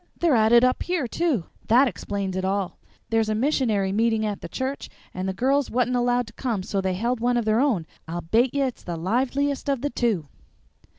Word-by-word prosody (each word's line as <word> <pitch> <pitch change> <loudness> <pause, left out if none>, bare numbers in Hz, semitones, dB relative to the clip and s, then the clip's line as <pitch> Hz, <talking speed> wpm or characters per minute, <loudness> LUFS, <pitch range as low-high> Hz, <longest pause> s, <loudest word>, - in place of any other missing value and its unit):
"They're 335 -4 +2
at 220 -2 +4
it 240 0 +7
up 255 0 +2
here, 355 -6 -1
too! 260 - 0 0.2
That 250 +5 +5
explains 195 -2 -3
it 185 - -2
all. 190 -1 -2 0.3
There's 225 -1 +2
a 215 - +1
missionary 220 -6 +1
meeting 220 +1 +1
at 205 -2 -3
the - - -7
church, 265 +1 -4 0.2
and 185 +1 -3
the - - +1
girls 265 +7 +1
wa'n't 250 +1 +1
allowed 245 0 +2
to 230 - -14
come 225 -7 -2
so 195 +1 -1
they 190 -1 -1
held 235 +5 -1
one 245 +1 +1
of 235 - 0
their 220 +1 +2
own, 245 - +1 0.2
and 165 +2 -4
I - - -2
bate 235 +10 +1
ye 280 - +2
it's 255 -3 -3
the 170 -2 -5
liveliest 265 - 0
of 275 -3 0
the 290 - -2
two." 215 - 0
230 Hz, 225 wpm, -24 LUFS, 200-260 Hz, 0.3 s, it